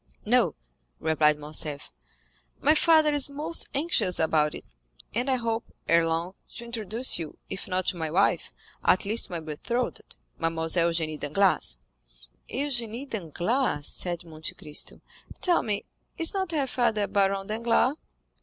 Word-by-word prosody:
"No," - - +3 0.4
replied 150 -1 +3
Morcerf, 150 -1 -3 0.7
"my 295 +2 +5
father 315 -1 +5
is 285 -1 +3
most 305 +4 -2
anxious 265 - +1
about 155 -1 +2
it; - - -7 0.5
and 245 +5 0
I 260 - +4
hope, 230 -1 -3
ere 165 0 +4
long, 165 +3 -1 0.2
to 235 - -5
introduce 230 -1 0
you, 160 -3 -6
if 195 - -5
not 185 -1 0
to 180 - -3
my 160 -2 -2
wife, 180 0 +2 0.3
at 185 - +4
least 220 +3 +3
to - - -10
my 170 - -2
betrothed—Mademoiselle 165 -2 -1
Eugénie 160 -2 -1
Danglars." 150 - +2 0.7
"Eugénie 250 -2 -1
Danglars," 185 - -1
said 175 +1 -2
Monte 160 -1 -5
Cristo; 150 -1 -3 0.4
"tell 355 -2 +3
me, 205 -2 -2 0.3
is 330 -1 +2
not 380 -3 -1
her 295 -4 +1
father 235 -5 +1
Baron 195 0 +1
Danglars?" 230 +5 +2
195 Hz, 140 wpm, -27 LUFS, 165-250 Hz, 0.7 s, my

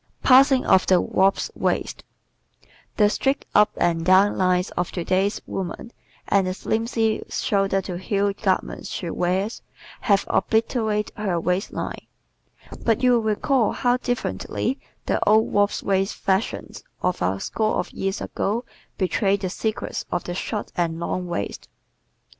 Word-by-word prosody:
Passing 265 0 +6
of 190 - +4
the 185 -2 +5
"Wasp 195 +2 +1
Waist" - - -1 0.6
¶ - - -27 0.3
The 210 - +5
"straight 270 +6 0
up 210 0 +6
and 165 -1 +1
down" 190 +3 +5
lines 180 -1 +1
of 175 0 -2
today's 185 +3 0
woman 195 +5 -5 0.4
and 195 -2 +2
the 185 - -2
slimpsy 225 +1 0
shoulder 195 -1 +1
to 180 -1 -5
heel 200 +1 0
garments 195 -2 -2
she 170 -3 -4
wears 190 +5 -1 0.4
have 200 -2 +2
obliterated 220 -2 0
her 190 -5 -1
waistline, 180 +4 -3 0.8
but 230 +2 +1
you 250 - +5
will 240 -1 +4
recall 250 -2 +1
how 245 0 +1
differently 250 +1 -2 0.3
the - - 0
old 220 +1 +4
"wasp 205 0 +2
waist" 195 0 0
fashions 195 +1 -2 0.2
of 180 - 0
a 95 +2 0
score 215 - -1
of 180 - -2
years 195 0 -3
ago 230 +5 -2 0.3
betrayed 195 +1 +1
the 185 -2 -2
secrets 215 +2 -3
of 175 - -1
the 175 - -5
short 205 +3 -4
and 165 -2 -1
long 180 +1 -3
waist. 100 -13 -4
195 Hz, 145 wpm, -23 LUFS, 185-220 Hz, 0.8 s, Passing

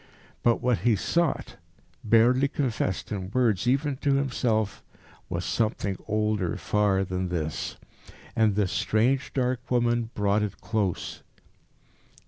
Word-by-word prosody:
But 120 -1 +2
what 125 -5 +2
he 115 +5 +3
sought, 170 - -1 0.5
barely 120 +5 +4
confessed 120 -9 -2
in 95 -3 -3
words 115 -2 +1
even 135 +2 +1
to 140 0 +1
himself, 120 -6 0 0.5
was - - -3
something 105 -3 0
older 105 -4 0
far 100 -2 +1
than 90 -1 -3
this. 80 -3 -3 0.6
And 110 -3 +3
this 100 -3 +1
strange, 125 +5 +1
dark 125 -1 -1
woman 120 -2 +1
brought 105 0 +2
it 105 -1 -3
close. 105 -6 -2
110 Hz, 120 wpm, -27 LUFS, 100-125 Hz, 0.6 s, barely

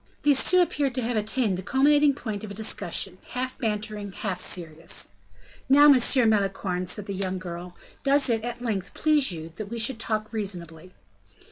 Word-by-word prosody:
These 290 -2 +4
two 365 0 +6
appeared 280 -6 -1
to 255 - 0
have 235 +1 -1
attained 215 -2 0
the - - -4
culminating 285 +6 +3
point 215 -6 -5
of 215 - -6
a 200 - -8
discussion 220 +1 -1
half 255 +1 -3
bantering, 210 -3 -3
half 190 -3 -3
serious. 165 -2 -4 0.6
"Now, 290 +2 +7
Monsieur 255 -2 +5
Malicorne," 195 -4 0
said 200 +3 -4
the 200 - -5
young 190 -1 -2
girl, 175 -1 -7 0.3
"does 280 0 +3
it, 225 -3 0
at 240 0 -5
length, 200 -5 -3
please 300 -5 +2
you 165 -1 -7
that 215 - -5
we 235 - -5
should 230 +1 +1
talk 215 -1 -2
reasonably?" 180 -5 -6
215 Hz, 175 wpm, -26 LUFS, 190-255 Hz, 0.6 s, Now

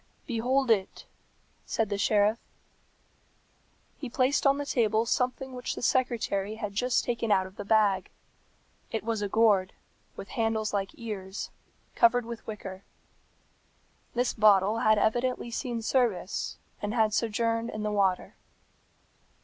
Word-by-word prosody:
"Behold 255 +1 +1
it," 195 -4 0 0.6
said 225 -2 0
the 200 - -1
sheriff. 210 +2 +3 1.6
He 270 - -5
placed 260 +3 +2
on 275 0 +4
the 285 - -3
table 225 -4 +1
something 255 +2 -1
which 250 -1 -4
the - - -7
secretary 225 -6 0
had 210 -2 -5
just 245 +4 +1
taken 235 -2 -1
out 190 -2 +3
of 190 +1 -12
the - - -6
bag. 200 -3 +2 0.8
It 225 - -3
was 225 -1 -2
a 205 - -2
gourd, 205 -3 +3 0.4
with 195 - -9
handles 225 -2 -1
like 195 -1 -1
ears, 200 -4 -6 0.4
covered 240 0 +4
with 235 -1 -8
wicker. 195 -3 -7 1.3
This 245 +1 +1
bottle 210 0 +4
had 215 0 +4
evidently 240 +2 0
seen 235 -2 -3
service, 225 -6 0 0.2
and 210 +2 -2
had 220 -2 +2
sojourned 230 +1 0
in 215 -2 -5
the 210 - -1
water. 195 -3 +1
225 Hz, 135 wpm, -28 LUFS, 205-240 Hz, 1.6 s, on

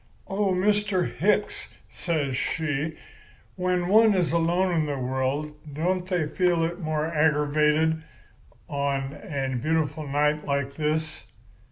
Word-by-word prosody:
"'Oh, 200 +1 0
Mr. 200 0 +1
Hicks,' 210 +3 0 0.2
says 150 -7 -2
she, 155 +2 -2 0.6
'when 180 -1 0
one 215 +1 +5
is 180 -3 +2
alone 175 +2 +2
in 160 -2 +1
the 145 -1 -2
world, 130 +4 -2 0.2
don't 180 +4 -1
they 180 -4 0
feel 175 0 +1
it 170 +2 -2
more 155 -3 -1
aggravated 155 0 +2 0.7
on 140 -1 -2
a 135 -8 -4
beautiful 155 0 -1
night 150 +2 +1
like 140 -1 -1
this? 155 +1 -2
160 Hz, 125 wpm, -26 LUFS, 145-180 Hz, 0.7 s, one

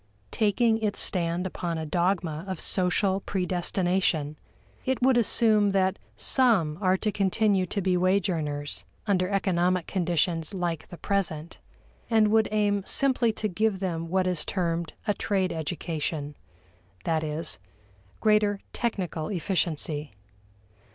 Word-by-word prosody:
Taking 220 +2 +2
its 210 -2 -1
stand 175 0 0
upon 170 -2 -3
a 160 - -3
dogma 170 -1 0
of 190 -3 -4
social 190 +1 +2
predestination, 180 -4 -1 0.5
it 260 0 0
would 260 0 +5
assume 215 -3 +3
that 190 0 +1 0.2
some 195 - +3
are 185 -1 +3
to 210 +2 -1
continue 195 -1 +1
to 200 - -2
be 185 -1 +2
wage 185 +1 +2
earners 150 -4 -3 0.2
under 185 -3 +1
economic 185 -3 +1
conditions 175 -1 0
like 175 -4 -2
the 175 - -10
present, 170 -3 -2 0.5
and 220 -2 +4
would 220 0 +3
aim 205 -1 +1
simply 255 -1 +3
to 215 - -2
give 210 0 0
them 165 -3 -3
what 185 +1 +1
is 180 -4 0
termed 170 -3 -2
a 205 - +3
trade 190 -3 0
education 155 -2 -3 0.7
that 160 -1 0
is, 155 - -3 0.6
greater 210 -2 +3
technical 180 -9 -2
efficiency. 160 - -2
185 Hz, 130 wpm, -27 LUFS, 165-205 Hz, 0.7 s, would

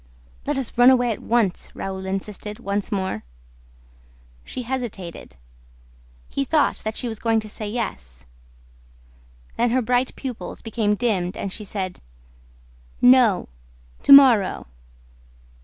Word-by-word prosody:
"Let 290 -1 0
us 265 -3 -3
run 245 +1 +8
away 245 -2 +3
at 215 - -5
once," 225 -6 0
Raoul 190 0 -5
insisted, 210 +2 -5
once 200 -1 -3
more. 190 - -2 1.2
She 250 - -6
hesitated. 230 - -6 0.9
He 275 - -2
thought 295 +2 +1
that 220 0 -5
she 245 - -2
was 220 -2 -5
going 225 -1 +2
to 215 - -10
say 210 0 -6
yes... 60 - -5 1.3
Then 240 +1 +2
her 255 +2 +2
bright 250 +2 0
pupils 255 -4 -7
became 220 -2 0
dimmed 195 -6 -1
and 195 - -4
she 215 - -5
said: 190 -2 -5 1.0
"No! 245 -6 +5 0.5
To - - +2
morrow!" 255 -8 +7
220 Hz, 125 wpm, -23 LUFS, 195-245 Hz, 1.3 s, run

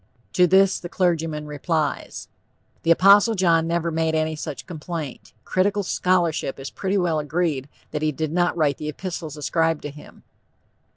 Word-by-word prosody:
To 180 0 +5
this 190 +1 +4
the 175 - -7
clergyman 165 -4 0
replies: 150 +1 -2 0.5
"The - - -2
Apostle 200 +6 +6
John 165 -4 +3
never 170 0 0
made 160 0 0
any 155 0 0
such 150 -2 -6
complaint. 160 -4 -6
Critical 200 +2 +1
scholarship 175 -7 0
is 135 - -6
pretty 195 +1 -1
well 170 -4 +1
agreed 150 -3 -1 0.2
that 150 - -3
he 155 0 +1
did 155 +1 -3
not 175 +1 +1
write 150 -4 +2
the 150 - -4
epistles 160 -2 -6
ascribed 160 +1 0
to 145 - -5
him." 150 +1 -15
165 Hz, 160 wpm, -23 LUFS, 150-180 Hz, 0.5 s, Apostle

